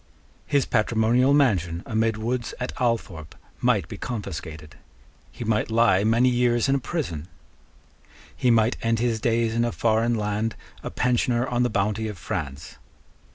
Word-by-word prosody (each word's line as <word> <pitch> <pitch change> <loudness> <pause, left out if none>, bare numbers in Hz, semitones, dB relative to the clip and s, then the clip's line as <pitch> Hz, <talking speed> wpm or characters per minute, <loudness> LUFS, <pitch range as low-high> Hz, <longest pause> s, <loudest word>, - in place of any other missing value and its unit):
His 140 -3 +2
patrimonial 115 +3 +2
mansion 95 - +2
amid 110 0 0
woods 120 +2 -3
at 125 - -3
Althorpe 105 -10 -2 0.2
might - - +1
be 105 0 -8
confiscated. 80 - -6 0.6
He - - -7
might 110 -1 0
lie 115 -4 +3
many 115 +3 +3
years 120 0 +2
in 135 - +2
a 140 - +2
prison. 105 - -4 1.1
He 125 - +1
might 115 0 +3
end 115 0 +1
his 115 -1 0
days 115 -1 +1
in 115 +1 +1
a 120 - 0
foreign 115 +1 +1
land 105 +1 -2 0.3
a - - -5
pensioner 120 -1 +1
on 120 0 0
the 125 - +2
bounty 105 +1 -1
of 105 -3 -6
France. 75 +1 -5
115 Hz, 155 wpm, -24 LUFS, 105-120 Hz, 1.1 s, lie